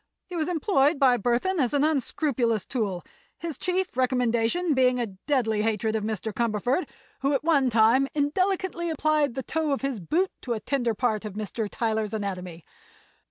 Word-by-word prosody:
He 360 - -8
was 320 0 -1
employed 310 -4 +2
by 260 -3 +4
Burthon 245 - 0
as 260 0 +1
an 285 - +3
unscrupulous 265 -6 0
tool, 200 -8 -2 0.3
his 335 -3 -5
chief 370 +3 -2
recommendation 250 +5 +1
being 255 -1 +3
a 240 - +1
deadly 220 +2 -1
hatred 220 0 0
of 215 - -1
Mr. 220 0 -3
Cumberford, 235 - 0 0.3
who 275 +2 +1
at 275 - 0
one 290 -5 +3
time 230 +4 +4
indelicately 345 +3 0
applied 305 -4 +1
the 265 - -3
toe 315 +1 -1
of 275 - 0
his 270 -5 -1
boot 340 - 0
to 245 - -2
a 220 - -3
tender 240 -1 -1
part 220 -2 0
of 210 -3 -6
Mr. 215 +1 -3
Tyler's 220 -2 -1
anatomy. 185 -5 -5
250 Hz, 170 wpm, -26 LUFS, 220-305 Hz, 0.3 s, by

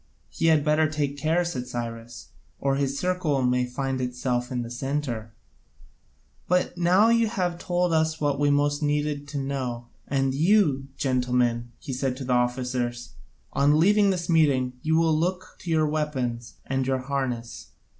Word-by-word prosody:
"He - - 0
had 155 -2 +4
better 155 0 +3
take 145 -2 -2
care," 160 +5 +1
said 125 -7 -4
Cyrus, 115 -1 -6 0.3
"or 135 -1 +1
his 140 0 -1
circle 180 -7 0
may 125 0 +1
find 130 +1 -3
itself 125 0 -2
in 125 -1 -2
the 115 - -8
centre. 125 -3 -3 1.2
But 180 0 +1
now 180 +5 +4
you 230 -1 +3
have 180 -5 -2
told 175 -1 0
us 160 0 +1
what 145 -2 0
we 145 0 +3
most 145 +1 +1
needed 145 -1 -1
to 145 0 -5
know, 130 -4 -3 0.2
and 135 -1 0
you, 155 -4 +3
gentlemen," 125 -2 0
said 130 -1 -2
he - - -11
to 135 - -6
the 125 - 0
officers, 125 - -1 0.4
"on 145 +2 +3
leaving 205 +4 +4
this 180 -3 -1
meeting, 140 -7 +3
you 160 0 +1
will 165 -1 +3
look 180 +3 -2
to 175 - -8
your 160 -1 +3
weapons 130 -7 -2
and 135 0 -1
your 130 -1 0
harness. 130 -4 -3
140 Hz, 165 wpm, -25 LUFS, 125-160 Hz, 1.2 s, had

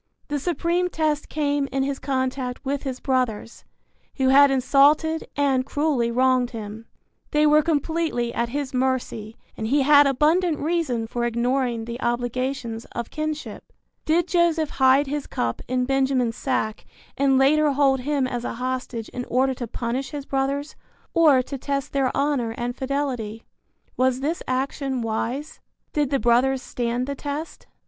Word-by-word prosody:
The 290 0 -1
supreme 345 +3 0
test 305 -3 -1
came 290 -2 0
in 270 0 0
his 275 0 -2
contact 260 -1 -2
with 275 +1 -1
his 260 -2 -4
brothers, 250 -4 -2 0.5
who 265 -1 +2
had 280 +1 +7
insulted 285 +4 +3
and 275 -2 +2
cruelly 275 -4 0
wronged 255 0 +2
him. 220 -1 -8 0.4
They 300 0 +3
were 300 0 +6
completely 310 -5 -1
at 235 0 -1
his 280 +1 -3
mercy 250 -4 -2 0.2
and 220 - -3
he 280 +4 +3
had 290 0 +7
abundant 310 +5 +2
reason 300 -8 -1
for 240 +1 -3
ignoring 240 0 0
the 235 +2 -6
obligations 245 -1 -2
of 235 -1 -5
kinship. 310 0 -5 0.3
Did 340 +3 +2
Joseph 335 -4 +2
hide 265 +2 +4
his 290 +1 -4
cup 115 -1 -2
in 250 0 0
Benjamin's 265 -3 +1
sack 220 -5 -2 0.3
and 270 -1 +3
later 295 +2 +4
hold 270 -1 +3
him 280 +1 0
as 245 -2 -3
a - - -3
hostage 250 -2 -3
in 245 0 -5
order 260 +2 +1
to 245 -2 -5
punish 240 +4 -3
his 290 -2 -6
brothers 275 +2 -2 0.4
or 300 -6 +5
to 270 +1 -6
test 280 +1 -3
their 270 -2 +2
honor 275 -5 0
and 245 0 -3
fidelity? 260 -6 -3 0.5
Was 255 0 +2
this 315 +5 -1
action 265 0 -2
wise? 240 +7 -3 0.3
Did 295 -3 +1
the 275 - +2
brothers 255 +2 +2
stand 240 +1 -2
the 280 - -3
test? 290 +3 -6
265 Hz, 155 wpm, -24 LUFS, 245-290 Hz, 0.5 s, had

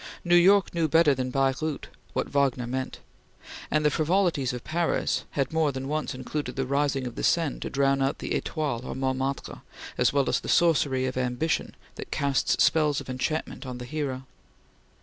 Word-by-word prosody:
New 175 0 +4
York 195 +3 +5
knew 165 -2 +1
better 160 -1 +5
than 130 -1 -2
Baireuth 135 +3 -1 0.3
what - - -1
Wagner 135 -3 +1
meant, 130 +2 -4 0.7
and 155 0 +1
the 150 - +4
frivolities 160 -4 +1
of 125 -1 -6
Paris 170 +1 0
had 135 +1 0
more 160 -2 +2
than 135 0 -5
once 155 -2 -2
included 130 0 -4
the 135 - -1
rising 140 0 0
of 125 - -5
the - - -6
Seine 165 -4 +1
to - - -4
drown 135 0 +2
out 135 +1 0
the - - -4
Etoile 145 -7 -2
or - - -5
Montmartre, 130 +1 -2 0.4
as - - +4
well 140 -1 +1
as - - +2
the - - -7
sorcery 145 -6 +3
of 130 0 -3
ambition 125 +6 -1 0.2
that - - -7
casts 140 -1 +1
spells 150 -3 +3
of - - -7
enchantment 150 +6 -3
on 130 -2 -6
the 125 - -7
hero. 130 -2 -4
140 Hz, 185 wpm, -27 LUFS, 130-155 Hz, 0.7 s, York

